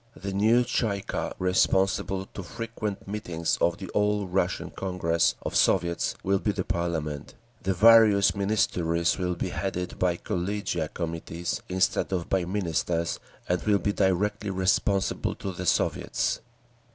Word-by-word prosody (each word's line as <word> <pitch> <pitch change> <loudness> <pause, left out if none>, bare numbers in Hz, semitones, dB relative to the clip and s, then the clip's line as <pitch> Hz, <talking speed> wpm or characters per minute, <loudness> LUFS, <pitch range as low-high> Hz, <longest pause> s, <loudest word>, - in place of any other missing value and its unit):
The 100 0 -5
new 110 +5 +4
Tsay 115 -4 0
ee - - -6
kah, - - -3
responsible 95 +1 +1
to - - -5
frequent 110 +2 -5
meetings 90 -5 -2
of 85 - +2
the 95 - -7
All 105 0 +1
Russian 90 -1 -1
Congress 85 -3 0
of - - -4
Soviets, 85 +7 +2
will 95 0 +2
be 105 - 0
the 95 -2 -2
parliament; 85 -6 -3 0.3
the 95 0 -1
various 110 -1 +6
Ministries 90 -5 +1
will 90 -1 -1
be 90 - -3
headed 90 -1 -4
by 90 -2 +1
collegia—committees—instead 85 -1 -2
of 90 -3 -2
by 95 -2 +2
Ministers, 85 -3 -1 0.3
and 90 0 0
will 105 -2 +3
be 100 +1 -1
directly 100 +2 +1
responsible 95 +1 +1
to 95 - -5
the 90 0 -5
Soviets…." - - 0
95 Hz, 140 wpm, -27 LUFS, 85-100 Hz, 0.3 s, various